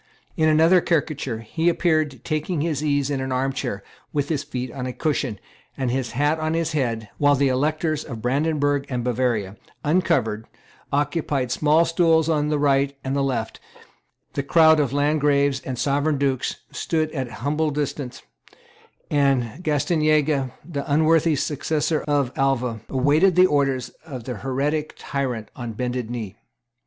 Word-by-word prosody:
In 155 0 +3
another 165 +4 +5
caricature, 145 -8 -1
he 160 +10 0
appeared 155 -7 +1
taking 155 +1 -2
his 155 -2 -1
ease 145 -1 +1
in 135 -2 -1
an 130 0 -3
arm 135 +1 0
chair, 105 -8 -4 0.3
with 145 -1 -1
his 150 -4 0
feet 130 -4 -5
on 130 -1 -5
a 125 - -4
cushion, 140 -8 -1 0.4
and 130 -3 -1
his 125 -2 -2
hat 145 +5 +1
on 155 +1 -1
his 165 -1 0
head, 115 -8 -2
while 145 -1 +5
the 140 0 +2
Electors 155 +3 0
of 120 -6 -7
Brandenburg 145 +2 0
and 125 -3 -2
Bavaria, 115 -5 -1 0.3
uncovered, 145 - +1 0.4
occupied 145 -3 0
small 155 +5 +3
stools 165 -1 +3
on 150 -2 +1
the 150 - +1
right 140 -1 +2
and 135 +1 -2
left; 130 -5 -1 0.7
the 140 - -1
crowd 160 +2 +5
of 140 -4 +1
Landgraves 145 -1 +2
and 130 -1 -4
Sovereign 145 +3 +1
dukes 135 -2 0 0.2
stood 155 -2 -1
at 130 -5 -3 0.2
humble 155 +2 +1
distance; 145 -3 -4 0.9
and 140 0 +1
Gastanaga, 155 -3 +1 0.2
the 145 -4 -4
unworthy 160 +1 +4
successor 150 +2 -1
of 140 -4 +1
Alva, 125 -5 0
awaited 150 +8 +3
the 180 0 +7
orders 135 -5 +1
of 135 -7 -8
the 125 -1 -5
heretic 140 +6 -2
tyrant 130 -6 -3
on 120 -2 -5
bended 125 0 -3
knee. 110 -4 -5
140 Hz, 150 wpm, -23 LUFS, 130-155 Hz, 0.9 s, the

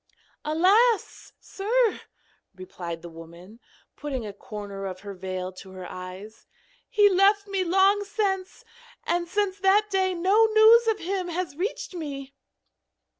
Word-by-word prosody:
'Alas! 390 +9 +2
sir,' 450 +3 0 0.5
replied 175 -2 -8
the - - -7
woman, 170 +6 -13 0.4
putting 270 -6 -5
a 205 - -7
corner 200 -1 -7
of 185 -1 -7
her 200 -1 -7
veil 185 0 -5
to 190 +1 -13
her 185 -1 -8
eyes, 185 +4 -10 0.4
'he 415 -1 +5
left 400 +1 +3
me 390 -2 -1
long 385 +3 +3
since, 390 -2 -3 0.4
and 345 0 0
since 400 +1 -1
that 405 +2 +3
day 375 -1 +1
no 390 +6 +4
news 440 +2 +6
of 445 -2 +2
him 370 0 -3
has 345 -3 -4
reached 380 +4 -4
me.' 280 -5 -6
355 Hz, 135 wpm, -25 LUFS, -, 0.5 s, news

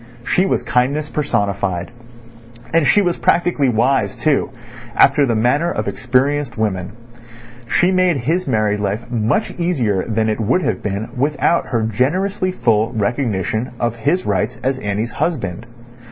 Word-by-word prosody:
She 185 +2 +2
was - - 0
kindness 140 +4 0
personified. 100 - -1 0.8
And 165 -4 +3
she 205 - +4
was 175 -2 0
practically 170 -6 +2
wise 125 +3 +1
too, 140 +3 +1 0.5
after 140 0 +5
the 115 - +1
manner 125 +9 +2
of - - -3
experienced 135 +3 0
women. 95 -5 -2 0.8
She 180 +1 +3
made 185 -4 +2
his 160 +8 -1
married 105 -4 +1
life 105 +4 -3
much 115 - 0
easier 125 - 0
than 110 0 0
it 110 0 -1
would 115 - +1
have 95 - -1
been 105 +2 -3
without 150 +5 +1
her 115 -2 0
generously 185 - 0
full 115 -8 +1
recognition 110 0 -1
of 120 -1 -1
his 150 +10 0
rights 105 +3 -1
as 130 +1 0
Annie's 105 +1 -2
husband. 115 - -3
125 Hz, 145 wpm, -18 LUFS, 110-150 Hz, 0.8 s, after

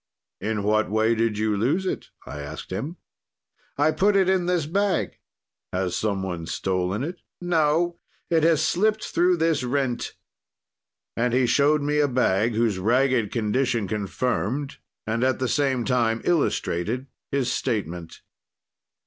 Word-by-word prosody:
"In 105 0 -2
what 110 +1 +2
way 110 +2 +2
did 115 -2 0
you 110 -1 +1
lose 140 - +1
it?" - - -3 0.2
I 75 - -7
asked 75 +4 -8
him. 135 - -4 0.8
"'I 150 +2 +3
put 200 +5 +2
it 190 -2 +4
in 185 -2 +2
this 175 -4 +1
bag.' 195 +3 0 0.5
"'Has 90 -1 -1
some 100 -3 -1
one 85 -3 -4
stolen 95 +4 -1
it?' 175 +4 -5 0.2
"'No, 170 0 +1 0.3
it 165 -2 +2
has 160 -1 +3
slipt 215 +4 +1
through 180 +1 +2
this 160 -3 +1
rent.' 125 -1 -1 1.0
"And 120 +1 +1
he 130 0 +3
showed 145 +4 +3
me 150 +1 +1
a 145 - +4
bag, 115 -4 +1
whose 110 -4 +1
ragged 120 +1 +2
condition 115 -1 0
confirmed, 115 +6 -2 0.3
and 115 +2 -1
at 130 0 +2
the 130 - -1
same 130 -3 +1
time 115 -3 +1
illustrated 125 - 0 0.2
his 135 -3 0
statement. 90 -9 -3
125 Hz, 145 wpm, -24 LUFS, 105-155 Hz, 1.0 s, it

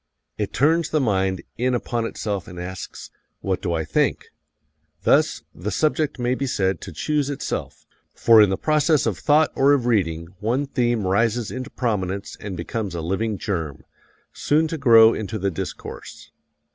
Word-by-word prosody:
It 105 -2 -3
turns 160 +4 +2
the 155 - +1
mind 95 -7 0 0.2
in 125 +1 +1
upon 120 -1 -2
itself 100 -5 -4
and 90 -1 -9
asks, 95 +1 -7 0.3
What 95 -2 -1
do 90 - -2
I 80 -1 -1
think? 75 - 0 0.7
Thus, - - +3
the 95 +5 -5
subject 150 +6 0
may 125 0 0
be 135 +1 -2
said 95 -7 0
to 95 - -8
choose 145 - -1
itself, 140 - -5 0.3
for 115 -2 +6
in 105 - +5
the 95 - 0
process 155 -1 +2
of 105 -6 -1
thought 150 +1 +3
or 140 +2 +4
of 135 -4 +1
reading 85 -8 0
one 120 +7 0
theme 120 -6 0
rises 115 +4 +1
into 130 +1 -5
prominence 100 -7 -2
and 100 -3 -6
becomes 95 +2 -4
a 85 - -3
living 95 +6 -1
germ, 80 -8 -4 0.5
soon 155 +2 +1
to 165 - -3
grow 115 -4 +7
into 110 0 -4
the 100 -1 -1
discourse. 80 - -8
110 Hz, 170 wpm, -23 LUFS, 95-135 Hz, 0.7 s, grow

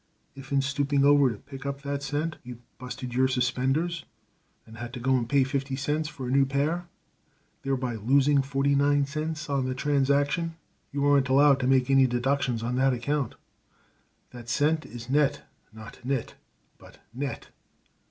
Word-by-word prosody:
If 135 0 -12
in 140 -1 +2
stooping 140 0 +1
over 145 -2 +5
to 110 - -5
pick 135 +4 -11
up 140 0 -5
that 140 0 -3
cent 150 +3 -2
you 125 -1 -8 0.2
busted 125 -1 -6
your 130 +1 +3
suspenders, 130 +7 0 0.6
and 115 0 -13
had 120 +1 -7
to 125 - -5
go 130 +2 +2
and 120 -2 -1
pay 140 -1 +4
fifty 135 0 -2
cents 150 +3 -1
for 135 -4 -7
a - - -2
new 135 +1 +4
pair, 145 +6 -1 0.7
thereby 130 -2 -2
losing 140 +5 +3
forty 135 +1 0
nine 140 0 +3
cents 155 +2 -4
on 140 -3 0
the 130 0 -2
transaction, 145 +4 +1 0.4
you 140 0 -1
aren't 140 -2 +3
allowed 140 +1 +5
to 130 - 0
make 130 0 +3
any 135 -1 +5
deductions 125 -1 0
on 125 +2 -2
that 135 0 +3
account. 135 +1 -2 1.0
That 120 -1 -10
cent 155 +4 +1
is 120 +1 -9
'Net' 145 +1 +1 0.3
not 110 0 -12
'Nit', 130 -2 -2 0.5
but - - -16 0.2
'Net.' 135 +3 -5
135 Hz, 170 wpm, -27 LUFS, 130-145 Hz, 1.0 s, over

